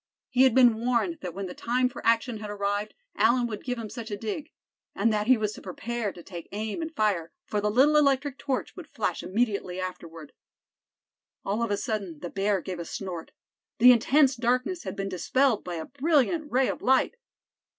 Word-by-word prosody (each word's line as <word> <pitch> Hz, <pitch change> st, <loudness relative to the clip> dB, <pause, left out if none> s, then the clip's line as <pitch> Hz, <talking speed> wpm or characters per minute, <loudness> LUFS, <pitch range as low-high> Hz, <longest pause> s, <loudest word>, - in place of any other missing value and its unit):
He 255 Hz, +1 st, +5 dB
had 255 Hz, -, +3 dB
been 245 Hz, -4 st, +6 dB
warned 250 Hz, +7 st, +1 dB
that 180 Hz, -2 st, -6 dB
when 195 Hz, 0 st, -4 dB
the 180 Hz, -, -6 dB
time 250 Hz, +2 st, +1 dB
for 250 Hz, -, -9 dB
action 230 Hz, +1 st, +2 dB
had 210 Hz, -1 st, -6 dB
arrived 205 Hz, +1 st, -2 dB, 0.2 s
Allan 240 Hz, +2 st, +3 dB
would 215 Hz, -3 st, -5 dB
give 250 Hz, -1 st, -3 dB
him 230 Hz, -2 st, -5 dB
such 230 Hz, -2 st, -7 dB
a 205 Hz, -, -3 dB
dig; 225 Hz, +9 st, -5 dB, 0.5 s
and 220 Hz, +2 st, +2 dB
that 210 Hz, 0 st, 0 dB
he 255 Hz, -1 st, +6 dB
was 210 Hz, -1 st, -1 dB
to -, -, -11 dB
prepare 220 Hz, +3 st, -4 dB
to 175 Hz, -, -13 dB
take 175 Hz, -3 st, -9 dB
aim 215 Hz, +7 st, -3 dB
and 320 Hz, 0 st, -4 dB
fire, 195 Hz, -8 st, 0 dB
for 210 Hz, -, -1 dB
the 210 Hz, -, +1 dB
little 270 Hz, +8 st, +4 dB
electric 280 Hz, -1 st, +2 dB
torch 270 Hz, -3 st, -3 dB
would -, -, -9 dB
flash -, -, -2 dB
immediately 200 Hz, -4 st, -1 dB
afterward. 165 Hz, -4 st, -7 dB, 1.1 s
All 205 Hz, +4 st, -1 dB
of 235 Hz, -, 0 dB
a 205 Hz, -, 0 dB
sudden 200 Hz, -7 st, -3 dB
the 175 Hz, +3 st, -7 dB
bear 195 Hz, -1 st, 0 dB
gave 180 Hz, 0 st, -6 dB
a 170 Hz, -, -5 dB
snort. 180 Hz, -4 st, -6 dB, 0.5 s
The 250 Hz, +2 st, +9 dB
intense 265 Hz, +3 st, +4 dB
darkness 250 Hz, +9 st, 0 dB
had -, -, -4 dB
been 195 Hz, 0 st, -3 dB
dispelled 230 Hz, +7 st, +1 dB
by 175 Hz, -, -5 dB
a 160 Hz, -1 st, -4 dB
brilliant 300 Hz, +2 st, +1 dB
ray 260 Hz, +1 st, +3 dB
of -, -, -3 dB
light. 265 Hz, -, +3 dB
220 Hz, 200 wpm, -27 LUFS, 200-255 Hz, 1.1 s, The